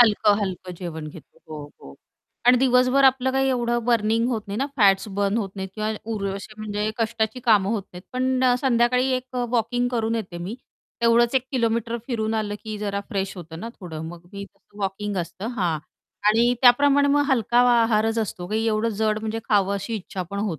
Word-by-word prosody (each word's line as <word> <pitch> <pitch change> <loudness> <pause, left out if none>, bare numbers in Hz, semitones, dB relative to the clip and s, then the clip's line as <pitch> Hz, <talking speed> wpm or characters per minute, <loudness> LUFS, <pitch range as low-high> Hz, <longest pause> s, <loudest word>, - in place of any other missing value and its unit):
हलकं-हलकं 205 -5 +2
जेवण 165 -3 -6
घेतो 155 0 -14
हो, 150 -2 -8
हो. 70 - -11 0.5
आणि 250 +1 +7
दिवसभर 255 +1 +4
आपलं 265 0 +4
काही 270 0 +2
एवढं 240 -2 0
बर्निंग 230 0 +2
होत 235 -4 -1
नाही 200 0 -4
ना 275 - 0
फॅट्स 195 -3 +4
बर्न 200 +1 +1
होत 200 -4 -3
नाहीत 190 0 -4
किंवा 215 0 -2 0.2
उर 205 -2 -2
असे 200 +2 -8
म्हणजे 210 0 -2
कष्टाची 225 +1 -1
कामं 210 -5 +3
होत 220 -3 -1
नाहीत 180 0 -10
पण 255 0 0
अ, 250 -1 +5
संध्याकाळी 250 0 +2
एक 255 +1 -9 0.2
वॉकिंग 245 +1 0
करून 230 -2 -1
येते 190 -6 -4
मी 180 +6 -5 0.5
तेवढंच 235 +1 +4
1 260 -1 +1
किलोमीटर 230 -2 0
फिरून 225 -3 -1
आलं 215 -2 -2
की 215 -1 -5
जरा 200 -1 -2
फ्रेश 195 -3 -3
होतं 165 -2 -9
ना, 230 - -5
थोडं 160 -4 -7
मग 170 0 -10
मी 200 0 -6
तसं 200 +1 -21
वॉकिंग 200 +1 -3
असतं 180 +4 -5
हां, 175 -6 0 0.5
आणि 235 +3 +4
त्याप्रमाणे 285 +3 +5
मग 290 +1 +3
हलका 240 -2 +2 0.2
आहारच 225 0 +1
असतो 185 -5 -3
की 220 +1 0
एवढं 220 +1 +1
जड 215 -1 +1
म्हणजे 220 +1 -3
खावं 200 -2 +2
अशी 200 +4 -4
इच्छा 190 -2 -5
पण 200 - -4
होत 200 -6 -2
220 Hz, 190 wpm, -23 LUFS, 200-240 Hz, 0.5 s, आणि